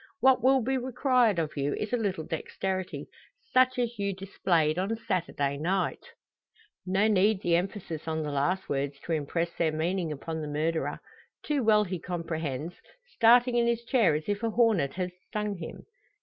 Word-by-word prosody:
What 265 Hz, -1 st, +5 dB
will 265 Hz, 0 st, +4 dB
be 265 Hz, +2 st, 0 dB
required 250 Hz, -4 st, +2 dB
of 160 Hz, -2 st, -2 dB
you 145 Hz, 0 st, -1 dB
is 215 Hz, +2 st, -4 dB
a -, -, +5 dB
little 200 Hz, -8 st, -1 dB
dexterity, 185 Hz, +4 st, -4 dB, 0.5 s
such 255 Hz, 0 st, +4 dB
as 240 Hz, -2 st, -2 dB
you 200 Hz, 0 st, 0 dB
displayed 175 Hz, -4 st, 0 dB
on 200 Hz, +4 st, 0 dB
Saturday 155 Hz, -8 st, -1 dB
night." 180 Hz, +5 st, -1 dB, 0.8 s
No 195 Hz, +3 st, +3 dB
need 205 Hz, -1 st, +3 dB
the 170 Hz, -1 st, +3 dB
emphasis 175 Hz, -3 st, -3 dB
on 160 Hz, 0 st, -1 dB
the 150 Hz, -, -3 dB
last 160 Hz, +7 st, 0 dB
words 140 Hz, 0 st, -2 dB
to -, -, -6 dB
impress 165 Hz, +2 st, -1 dB
their 160 Hz, -2 st, +1 dB
meaning 165 Hz, +2 st, -1 dB
upon 160 Hz, +2 st, -5 dB
the 150 Hz, -, -4 dB
murderer. 160 Hz, +2 st, -1 dB, 0.4 s
Too 290 Hz, -4 st, 0 dB
well 215 Hz, -1 st, +5 dB
he 185 Hz, -3 st, -4 dB
comprehends, 165 Hz, -3 st, -4 dB, 0.4 s
starting 240 Hz, +2 st, +5 dB
in 235 Hz, 0 st, +3 dB
his 235 Hz, 0 st, 0 dB
chair 230 Hz, -, +3 dB
as 155 Hz, -, -4 dB
if 205 Hz, 0 st, -1 dB
a 230 Hz, -, 0 dB
hornet 215 Hz, -, +2 dB
had 180 Hz, -1 st, -2 dB, 0.2 s
stung 210 Hz, -2 st, -2 dB
him. 160 Hz, -, -8 dB
185 Hz, 175 wpm, -28 LUFS, 160-225 Hz, 0.8 s, What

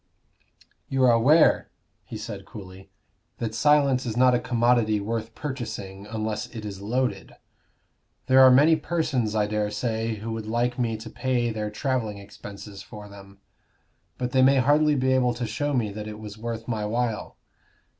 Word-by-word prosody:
"You 135 Hz, -1 st, +1 dB
are 125 Hz, -, +6 dB
aware," 135 Hz, +8 st, +4 dB, 0.4 s
he 110 Hz, -, -7 dB
said, 105 Hz, -2 st, -7 dB
coolly, 95 Hz, -2 st, -11 dB, 0.5 s
"that 110 Hz, -2 st, -3 dB
silence 140 Hz, 0 st, +3 dB
is 115 Hz, -2 st, -4 dB
not 125 Hz, 0 st, +5 dB
a 120 Hz, -, +3 dB
commodity 120 Hz, -3 st, +2 dB
worth 115 Hz, +2 st, -4 dB
purchasing 105 Hz, -8 st, -6 dB
unless 110 Hz, -1 st, -3 dB
it 110 Hz, -3 st, -8 dB
is 100 Hz, -2 st, -7 dB
loaded. 110 Hz, -1 st, -2 dB, 0.9 s
There 130 Hz, 0 st, +5 dB
are 130 Hz, -, +9 dB
many 145 Hz, +6 st, +6 dB
persons, 150 Hz, -9 st, -1 dB
I 105 Hz, -1 st, +2 dB
dare 105 Hz, 0 st, -1 dB
say, 110 Hz, +1 st, -2 dB
who 110 Hz, +2 st, -6 dB
would 110 Hz, -1 st, -5 dB
like 120 Hz, +2 st, -1 dB
me 115 Hz, -2 st, 0 dB
to 115 Hz, +1 st, -9 dB
pay 120 Hz, -1 st, 0 dB
their 105 Hz, -1 st, -3 dB
travelling 110 Hz, -2 st, -2 dB
expenses 100 Hz, 0 st, -10 dB
for 105 Hz, -1 st, -11 dB
them. 100 Hz, 0 st, -14 dB, 0.8 s
But 125 Hz, 0 st, -3 dB
they 130 Hz, -, +3 dB
might 135 Hz, 0 st, +5 dB
hardly 150 Hz, +3 st, +3 dB
be 130 Hz, -1 st, +2 dB
able 125 Hz, -2 st, +2 dB
to 120 Hz, 0 st, -3 dB
show 120 Hz, +7 st, -2 dB
me 120 Hz, -7 st, 0 dB
that 105 Hz, +1 st, -7 dB
it 105 Hz, 0 st, -7 dB
was 105 Hz, -1 st, -9 dB
worth 115 Hz, 0 st, -6 dB
my 110 Hz, -3 st, -2 dB
while." 115 Hz, +1 st, -2 dB
115 Hz, 170 wpm, -25 LUFS, 105-130 Hz, 0.9 s, are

